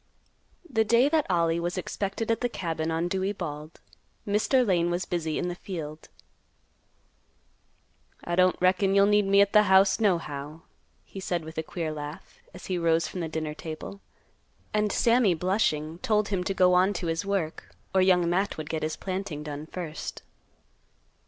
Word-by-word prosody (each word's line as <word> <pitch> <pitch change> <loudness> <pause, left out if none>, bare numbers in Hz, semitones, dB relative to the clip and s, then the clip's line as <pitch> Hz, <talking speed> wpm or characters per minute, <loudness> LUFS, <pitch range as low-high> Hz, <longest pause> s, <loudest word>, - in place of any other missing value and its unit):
The 225 -7 +2
day 235 +5 +4
that 310 -5 +1
Ollie 170 -2 +2
was 175 +2 -3
expected 200 +4 -3
at 225 - 0
the 245 - 0
cabin 165 -6 -3
on 165 +1 0
Dewey 190 +2 -1
Bald, 155 -4 -7 0.5
Mr. 220 +5 +2
Lane 175 -4 +2
was 175 +1 -1
busy 160 -3 -2
in 180 - -1
the 175 - -2
field. 160 -4 -7 2.1
"I 175 - -4
don't 185 0 +3
reckon 190 +2 +3
you'll 200 0 +6
need 205 -1 +3
me 200 +1 +5
at 200 0 +2
th' - - +7
house 190 +2 +5
nohow," 160 -6 -1 0.4
he 195 - -9
said 175 -3 -2
with 160 0 -6
a - - +1
queer 160 0 -4
laugh, 150 0 -8
as 180 - -11
he 185 -2 -2
rose 165 0 +2
from 185 - -6
the 165 -2 -3
dinner 155 -1 -3
table; 160 +6 -8 0.7
and 210 -1 +1
Sammy, 230 -5 +3
blushing, 165 -3 0
told 210 0 +1
him 190 -3 -1
to 195 - 0
go 180 -1 +4
on 185 +3 +4
to 185 - -4
his 165 0 -1
work, 195 -6 -3 0.2
or 190 - +4
Young 180 -2 +4
Matt 190 +4 0
would 155 0 -5
get 160 -1 -2
his 155 0 -2
planting 185 -6 -4
done 150 0 -6
first. 160 -3 -6
180 Hz, 175 wpm, -27 LUFS, 160-200 Hz, 2.1 s, th